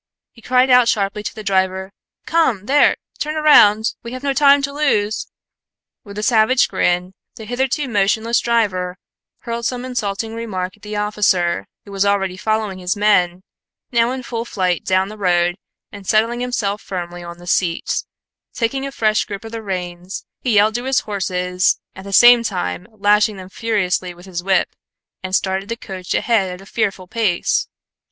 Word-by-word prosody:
He 230 - -19
cried 255 +2 +3
out 250 -1 +6
sharply 200 -1 0
to 210 - -6
the 215 - -8
driver, 190 -1 0 0.3
"Come, 260 - +1
there! 285 +5 +4 0.2
Turn 305 +1 -2
round! 220 -8 +5
We 235 +1 -8
have 255 +1 -7
no 280 -1 +1
time 280 0 +5
to 280 0 -2
lose!" 225 -8 0 0.8
With 200 -3 -11
a 210 - -3
savage 230 +2 +4
grin, 180 +1 0 0.2
the 220 - -9
hitherto 265 +5 -1
motionless 220 +2 +1
driver 190 -6 0 0.4
hurled 235 0 -3
some 250 0 -4
insulting 220 -3 -3
remark 190 -5 -4
at 210 - -29
the 210 +1 -6
officer, 205 -4 +1 0.2
who 200 - -12
was 195 0 0
already 195 -2 +1
following 215 -1 -2
his 180 +3 -1
men, 185 -3 +2 0.5
now 235 -1 +3
in 260 0 -5
full 230 -1 -4
flight 185 -7 -1
down 190 +1 +1
the 215 0 -10
road, 175 -2 +2 0.4
and 195 -2 -11
settling 230 +3 +2
himself 225 -5 -2
firmly 175 -2 -6
on 170 0 -9
the 175 - -14
seat, 170 -1 0 0.5
taking 270 +4 -1
a - - -6
fresh 215 -4 +1
grip 200 +2 -7
of 225 - -8
the 230 -1 -5
reins, 180 -2 -5
he 245 -4 0
yelled 210 +2 +4
to 240 +3 -3
his 265 -1 +2
horses, 180 -3 0 0.2
at 190 - -10
the 200 - -7
same 240 +4 +8
time 135 - -3
lashing 210 0 +2
them 185 0 -10
furiously 185 -5 -1
with 175 +1 -15
his 180 -2 -5
whip, 190 -1 +1 0.5
and 185 0 -2
started 190 +1 -1
the 230 - -3
coach 185 -4 -5
ahead 205 -6 +1
at 180 - -8
a 195 - -13
fearful 200 -3 -2
pace. 200 -4 0
210 Hz, 175 wpm, -19 LUFS, 185-235 Hz, 0.8 s, same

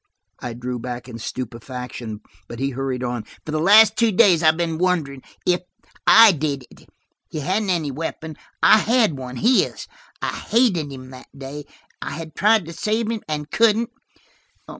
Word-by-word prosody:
I 120 - -5
drew 125 +1 -5
back 120 +1 -6
in 115 -2 -9
stupefaction, 120 -2 -7 0.3
but 120 - -8
he 135 +3 -2
hurried 130 -1 -3
on. 120 -2 -3 0.2
"For 155 - -5
the 155 - -1
last 210 +5 +6
two 230 -1 +2
days 180 -3 +4
I've 160 -1 +4
been 165 -2 -2
wondering–if 175 0 -1 0.5
I 225 -1 +9
did 145 -5 -3
it! - - -19 0.4
He 155 - -5
hadn't 195 +7 -1
any 165 -6 0
weapon; 160 +2 -6 0.3
I 215 - +7
had 225 - +2
one, 130 -1 -7
his. 240 - +1 0.3
I - - -3
hated 190 - +1
him 130 -1 -10
that 130 0 -12
day; 140 +2 -8 0.4
I - - -5
had 160 0 -8
tried 215 -1 +3
to 170 - -8
save 220 +5 -1
him, 225 -2 -4
and 150 -1 -4
couldn't. 230 0 +2
155 Hz, 165 wpm, -21 LUFS, 130-200 Hz, 0.5 s, I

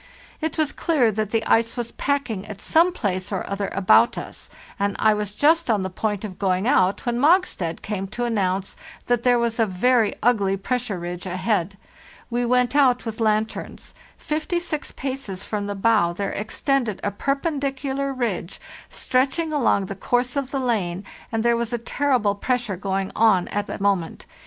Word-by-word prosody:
It 315 0 -2
was 310 -2 +1
clear 275 -9 +2
that 215 0 -2
the 225 0 0
ice 230 +2 +2
was 235 -1 -3
packing 260 -9 -2
at 205 -2 -8
some 335 - +3
place 195 - -3
or 190 - -3
other 200 0 -2
about 195 +5 +4
us, - - -8 0.3
and 200 0 0
I 215 -1 +4
was 210 -1 -3
just 320 +4 +3
on 210 -4 +2
the 190 - -4
point 210 +2 -2
of 185 -3 -8
going 190 +1 +1
out 200 -6 +2
when 240 0 0
Mogstad 290 - +2
came 195 -2 -3
to 240 +5 -4
announce 195 -4 -1 0.3
that 245 -1 +1
there 245 0 +4
was 235 -1 -1
a 225 - +3
very 220 +4 +2
ugly 200 -5 +2
pressure 240 0 -2
ridge 175 +1 -6
ahead. 185 0 -1 0.5
We 240 0 0
went 250 +2 +2
out 255 -4 +4
with 225 0 -5
lanterns. 220 0 -1 0.2
Fifty 310 +3 -2
six 315 -4 -4
paces 260 -8 -5
from 205 -1 -3
the 205 - -3
bow 200 -4 +3
there 200 +3 -3
extended 230 0 -1
a 205 - 0
perpendicular 275 - -2
ridge 225 -9 -3 0.3
stretching 275 +5 0
along 240 -8 +2
the 195 - -5
course 245 +6 0
of 275 -2 -1
the 275 - -2
lane, 200 -7 -1 0.3
and 225 -1 -1
there 235 0 +3
was 235 0 -2
a - - +1
terrible 235 -3 +1
pressure 240 0 -1
going 195 +1 -2
on 215 -5 +4
at 205 0 -2
the - - -5
moment. 195 -4 0
225 Hz, 180 wpm, -23 LUFS, 195-255 Hz, 0.5 s, about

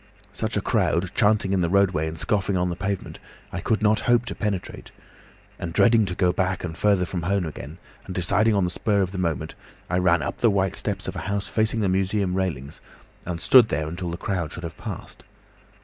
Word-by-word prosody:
Such - - -2
a - - +1
crowd, 90 +2 0
chanting 105 -3 +2
in 95 - +2
the 85 - +1
roadway 95 -5 +2
and 80 +1 -5
scoffing 100 +2 0
on 90 0 0
the - - -3
pavement, 100 +1 -4 0.3
I - - -3
could 110 -1 0
not 110 +1 +4
hope 120 0 +4
to - - -4
penetrate, 105 -4 -4 0.7
and 85 -1 -5
dreading 115 0 +4
to 90 - -3
go 90 -1 +2
back 95 -1 -1
and 85 -2 -4
farther 100 0 +2
from 90 0 -4
home 95 +2 0
again, 80 0 -8 0.3
and 95 - -6
deciding 105 +5 +2
on 100 - +2
the 90 - 0
spur 100 +2 +1
of 95 - -3
the 95 - -5
moment, 85 -6 -2 0.4
I 90 - +2
ran 85 -1 +3
up - - -4
the 115 - +4
white 95 -2 +1
steps - - -3
of - - -4
a - - -3
house 100 0 -2
facing 110 0 0
the 100 - +1
museum 95 0 0
railings, 80 -7 -3 0.5
and 85 -2 -3
stood 125 +5 +6
there 75 -2 -2
until 85 +2 -4
the 85 - -4
crowd 85 -5 -2
should 90 - -7
have 85 - -6
passed. - - -8
95 Hz, 220 wpm, -24 LUFS, 85-100 Hz, 0.7 s, stood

